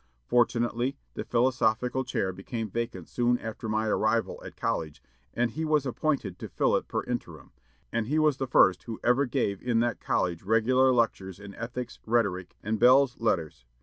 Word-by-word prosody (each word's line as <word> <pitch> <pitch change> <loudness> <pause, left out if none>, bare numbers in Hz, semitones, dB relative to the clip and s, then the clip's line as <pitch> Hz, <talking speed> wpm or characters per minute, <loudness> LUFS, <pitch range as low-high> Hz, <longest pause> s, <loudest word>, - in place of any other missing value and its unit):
Fortunately, 120 - +1 0.2
the - - -4
philosophical 125 +1 +1
chair 95 -7 -2
became 110 +3 -5
vacant 115 +2 -4
soon 120 0 +1
after 110 0 -6
my 110 +1 0
arrival 110 +1 0
at - - -9
college, 75 -2 -2 0.4
and 120 -1 +1
he 160 - -4
was 155 -3 +2
appointed 130 - -1
to - - -7
fill - - +1
it - - -1
per - - -2
interim; - - -6 0.4
and 115 -1 -1
he 150 +4 0
was 155 -3 +3
the 135 - -2
first 95 -7 +4
who 110 +3 -7
ever 130 +3 +3
gave 115 -6 -1
in 120 -2 +1
that 120 -3 -1
college 85 -2 0
regular 120 +6 +3
lectures 100 -6 0
in 100 -1 -10
ethics, 120 +2 -6
rhetoric, 100 -6 0
and 110 +1 -1
belles 125 +1 +5
lettres. 85 - -1
115 Hz, 175 wpm, -28 LUFS, 105-125 Hz, 0.4 s, belles